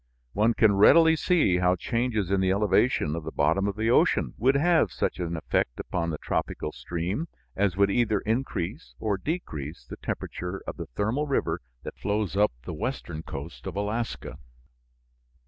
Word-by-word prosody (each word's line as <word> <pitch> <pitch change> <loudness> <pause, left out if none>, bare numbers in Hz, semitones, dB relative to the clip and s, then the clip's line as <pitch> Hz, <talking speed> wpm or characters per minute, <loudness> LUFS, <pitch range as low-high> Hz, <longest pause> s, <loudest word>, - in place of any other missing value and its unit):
One 110 +3 +3
can 110 -2 +5
readily 160 +10 +7
see 160 - +3
how 90 0 +3
changes 110 -1 -1
in 100 -1 +2
the 95 - +2
elevation 100 -4 +2
of 85 - -4
the - - -5
bottom 80 +7 +2
of 100 - -2
the 110 +2 +1
ocean - - +3
would 130 +4 +3
have 160 - +3
such 75 - -2
an 85 -1 -2
effect - - -1
upon 85 -2 -2
the 80 - -3
tropical 75 - -2
stream 90 - -3 0.3
as 95 -2 +1
would 100 0 +4
either 110 -2 +2
increase 110 - -3
or 100 -3 -1
decrease 80 - -4
the - - -9
temperature 90 +2 -5
of - - -6
the - - -6
thermal 110 - -1
river 140 - 0 0.2
that - - -8
flows 105 -1 -1
up 105 +1 +4
the 90 - -5
western 90 - -4
coast 70 -2 -8
of - - -5
Alaska. 105 +4 -3
100 Hz, 170 wpm, -27 LUFS, 90-120 Hz, 0.3 s, readily